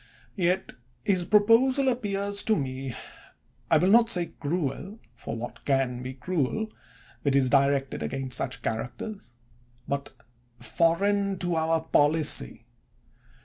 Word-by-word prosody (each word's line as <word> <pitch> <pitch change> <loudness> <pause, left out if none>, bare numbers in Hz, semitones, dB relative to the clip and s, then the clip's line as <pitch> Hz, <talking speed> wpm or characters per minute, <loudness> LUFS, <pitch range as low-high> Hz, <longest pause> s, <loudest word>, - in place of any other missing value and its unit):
Yet 185 0 0 0.3
his 185 -4 +2
proposal 230 +7 +4
appears 205 -5 0
to 220 - +2
me, 130 - -4 0.7
I - - +6
will 185 +2 +3
not 230 +1 +6
say 175 -5 +1
cruel 165 +5 -3 0.2
(for 115 - -6
what 115 +1 -7
can 135 -3 0
be 130 +1 -6
cruel 180 - -1 0.5
that 140 -2 +1
is 130 -2 +3
directed 140 -1 +2
against 135 -1 -2
such 130 - -2
characters?), 120 - -5 0.5
but 140 0 -3 0.5
foreign 195 - +1
to 175 -1 -2
our 160 0 +1
policy. 150 - +1
165 Hz, 120 wpm, -27 LUFS, 135-200 Hz, 0.7 s, I